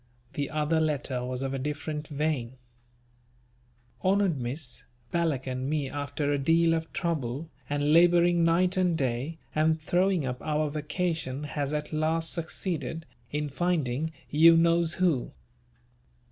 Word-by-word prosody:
The 140 -1 -2
other 155 +1 +1
letter 145 -5 -1
was 125 +1 -3
of 135 0 -2
a 135 - -2
different 150 +2 -4
vein: 145 -5 -2 1.5
"HONOURED 190 -5 +2
Miss, 125 0 -4 0.3
Balak 160 -6 0
and 130 +1 -3
me 150 -3 -1
after 145 0 -2
a 145 - +1
deal 165 +4 +3
of 160 0 -2
trouble 155 -3 -2 0.2
and 145 +1 +1
labouring 175 0 +5
night 180 +3 +3
and 180 -3 +2
day 135 +4 -2 0.2
and 160 +1 +2
throwing 180 0 +1
up 125 -1 -4
our 150 -1 0
vacation 150 -2 -2
has 145 -1 -3
at 150 0 -3
last 160 +1 0
succeeded 165 -2 -3 0.3
in 150 0 -1
finding 155 -2 -1 0.2
you 165 +2 +7
knows 170 0 +3
who. 170 -9 +1
155 Hz, 135 wpm, -28 LUFS, 140-165 Hz, 1.5 s, you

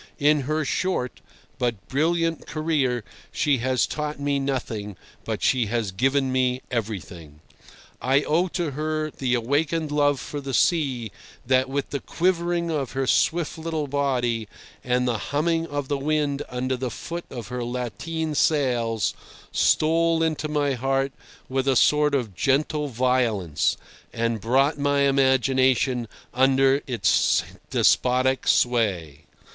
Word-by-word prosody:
In 150 0 +3
her 155 0 0
short, 140 -3 -2 0.4
but 120 -5 -2
brilliant, 165 +3 0
career 145 -7 0 0.3
she 145 -4 +1
has 130 0 +1
taught 150 -1 -4
me 140 0 0
nothing, 115 -8 -3 0.3
but - - -3
she 125 -4 +2
has 115 -2 -1
given 135 +6 +1
me 130 0 0
everything. 90 -9 -5 0.6
I 135 +3 +2
owe 170 +4 +1
to 170 -3 -2
her 155 +2 -2
the 130 -3 -1
awakened 145 +6 0
love 145 -2 +2
for 145 +3 -6
the 135 -2 -3
sea 130 - +1 0.3
that, 130 +1 +2
with 140 0 -3
the 140 - -2
quivering 170 0 0
of 140 -5 -2
her 135 0 -1
swift 165 +4 +1
little 160 -2 -2
body 125 -5 -1 0.4
and 125 0 +1
the 115 -3 0
humming 165 +4 0
of 145 -2 -3
the 140 0 -1
wind 145 -1 0
under 130 +1 -2
the 125 0 -3
foot 170 +7 -6
of 120 -3 -7
her 125 -1 -3
lateen 125 - -3
sails, 120 -8 +1 0.4
stole 165 +1 +2
into 155 -1 -1
my 145 -2 +1
heart 135 +2 0 0.4
with 135 +1 -1
a 135 - +3
sort 150 +3 +4
of 120 -7 -2
gentle 145 - 0
violence, 115 - +1 0.3
and 115 -2 -1
brought 135 +7 +2
my 145 0 +2
imagination 130 -2 +2 0.3
under 135 +2 +3
its 125 -3 +2 0.3
despotic 130 +1 +2
sway. 95 - +1
135 Hz, 135 wpm, -24 LUFS, 125-150 Hz, 0.6 s, sort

